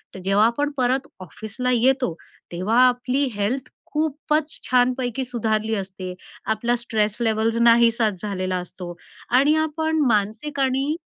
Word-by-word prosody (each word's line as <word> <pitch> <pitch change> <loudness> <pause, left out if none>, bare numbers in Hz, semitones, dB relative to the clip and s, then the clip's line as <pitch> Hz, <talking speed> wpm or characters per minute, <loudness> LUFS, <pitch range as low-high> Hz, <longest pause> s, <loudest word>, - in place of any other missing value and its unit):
तर - - -7
जेव्हा 200 +3 +4
आपण 290 +6 0
परत 260 +2 +1
ऑफिसला 220 - -4
येतो, 250 -5 +2 0.4
तेव्हा 200 +8 +1
आपली 250 +3 0
हेल्थ 240 +6 -2 0.2
खूपच 305 0 -1
छानपैकी 250 0 +1
सुधारली 220 -3 -1
असते. 190 -2 -5 0.4
आपला 235 +3 +1
स्ट्रेस 215 -3 -1
लेवल्स 225 0 +1
नाहीसाच 230 -4 +4
झालेला 185 -3 -2
असतो. 180 0 -7 0.4
आणि 275 +5 +4
आपण 315 0 0
मानसिक 220 +7 -1
आणि 270 +3 +1
235 Hz, 125 wpm, -23 LUFS, 210-265 Hz, 0.4 s, जेव्हा